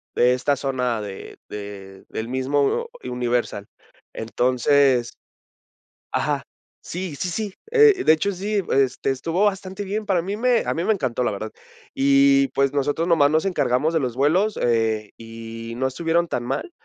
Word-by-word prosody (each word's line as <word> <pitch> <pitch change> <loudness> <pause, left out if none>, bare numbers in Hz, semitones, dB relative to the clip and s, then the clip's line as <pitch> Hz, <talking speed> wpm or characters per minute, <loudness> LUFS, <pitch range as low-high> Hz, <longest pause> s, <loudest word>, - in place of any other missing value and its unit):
de 125 +1 +4
esta 140 +3 +1
zona 125 -4 -1
de 100 -2 -8
de 100 -2 -9
del 110 +1 -4
mismo 140 - 0 0.2
Universal. 120 -4 -2 0.5
Entonces 125 +2 +2 1.0
ajá. - - 0 0.4
Sí, 175 -3 -5
sí, 180 - -2
sí, 205 +2 -4 0.2
eh, 440 -4 +5
de - - +7
hecho, 160 +6 +1
sí, 200 +2 -1
este, 135 0 +1
estuvo 165 +9 0
bastante 190 0 -3
bien, 210 +3 -3
para 190 -4 +1
mí 195 +4 -4
me 245 +1 +2
a - - 0
mí 165 +2 -2
me - - +3
encantó, 130 - -1
la - - +1
verdad. 110 +1 -5 0.4
Y, 140 0 +4
pues, 140 +1 0
nosotros 145 +4 0
nomás 145 -4 +4
nos 160 +5 +1
encargamos 150 -2 +1
de 160 - +2
los 125 -3 -2
vuelos, 180 +10 +2
eh, 110 -3 +1
y 115 0 -8
no 130 - +1
estuvieron 165 +5 0
tan 120 - -2
mal. 350 - -3
140 Hz, 160 wpm, -23 LUFS, 120-180 Hz, 1.0 s, de